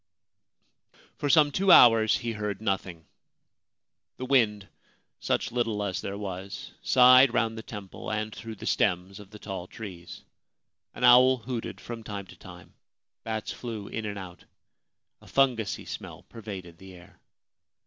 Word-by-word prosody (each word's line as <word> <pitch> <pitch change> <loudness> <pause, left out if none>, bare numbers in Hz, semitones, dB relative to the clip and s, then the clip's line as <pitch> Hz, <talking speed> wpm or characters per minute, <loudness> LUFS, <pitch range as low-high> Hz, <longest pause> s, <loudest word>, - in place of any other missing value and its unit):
For 145 - -2
some 150 -1 +5
two 190 +4 +2
hours 115 -7 +7
he 115 - -4
heard 105 -3 -4
nothing. 95 -6 -3 1.1
The 130 - -5
wind 110 -7 +2 0.3
— - - -46
such - - 0
little 115 -4 -1
as 100 -1 -3
there 100 +1 -5
was 95 -1 -7
— - - -37
sighed 125 0 +6
round 115 -2 +1
the 110 - -6
temple 105 -2 -8
and 110 0 -3
through 115 -1 -8
the - - -10
stems 95 0 0
of 100 -2 -13
the 105 - -12
tall 95 -3 -7
trees. 90 -6 -10 0.7
An - - -6
owl 130 +1 +7
hooted 120 0 -6
from 115 -1 -8
time 100 -3 -6
to - - -15
time. - - -14 0.5
Bats 110 -1 -4
flew 110 -4 -7
in 110 -1 -4
and 100 -1 -5
out. 90 -2 -10 0.8
A - - -17
fungusy 125 -6 0
smell - - -8
pervaded 95 -6 -10
the 95 -1 -12
air. 90 0 -17
110 Hz, 155 wpm, -27 LUFS, 95-120 Hz, 1.1 s, hours